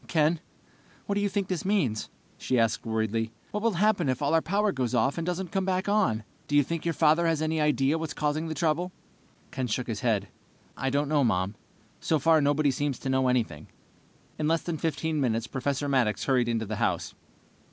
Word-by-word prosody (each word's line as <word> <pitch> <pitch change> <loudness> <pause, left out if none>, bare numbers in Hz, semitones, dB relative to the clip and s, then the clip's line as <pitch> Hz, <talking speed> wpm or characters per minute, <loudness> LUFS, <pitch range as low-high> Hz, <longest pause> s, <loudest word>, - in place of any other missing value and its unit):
"Ken, 160 0 +2 0.7
what 200 - -1
do 205 - 0
you 205 - +1
think 200 -1 -1
this 185 -4 -2
means?" 165 - 0 0.3
she 130 - 0
asked 115 -1 +1
worriedly. 110 0 -1 0.2
"What 210 - -2
will 230 0 +2
happen 190 -4 +2
if 130 - 0
all 145 +1 0
our 165 - +4
power 200 +5 +1
goes 130 -3 -1
off 135 +7 +1
and 165 - -3
doesn't 180 -1 -2
come 195 -1 0
back 185 0 -1
on? 200 - +2 0.2
Do 145 - -1
you 145 - +6
think 165 +4 -4
your 165 -2 0
father 160 +2 +4
has 165 -2 +1
any 155 0 0
idea 150 0 +2
what's 160 -1 -4
causing 150 +2 -1
the 160 - -4
trouble?" 165 +4 0 0.6
Ken 130 -1 -2
shook 125 +2 -1
his 110 -3 -4
head. 110 -5 0 0.5
"I 135 - -1
don't 140 +2 0
know, 145 -1 +2
Mom. 95 -4 +1 0.5
So 160 - +1
far, 160 0 +4
nobody 145 0 +2
seems 140 -1 -1
to 135 - -5
know 130 0 +2
anything." 110 -12 -1 0.7
In 150 - 0
less 165 +1 +1
than 165 -3 -3
15 160 0 -1
minutes, 115 -3 0
Professor 140 +3 -2
Maddox 125 -6 +1
hurried 125 -3 +2
into 115 -1 0
the 110 0 -4
house. 95 -7 -1
145 Hz, 210 wpm, -27 LUFS, 125-165 Hz, 0.7 s, you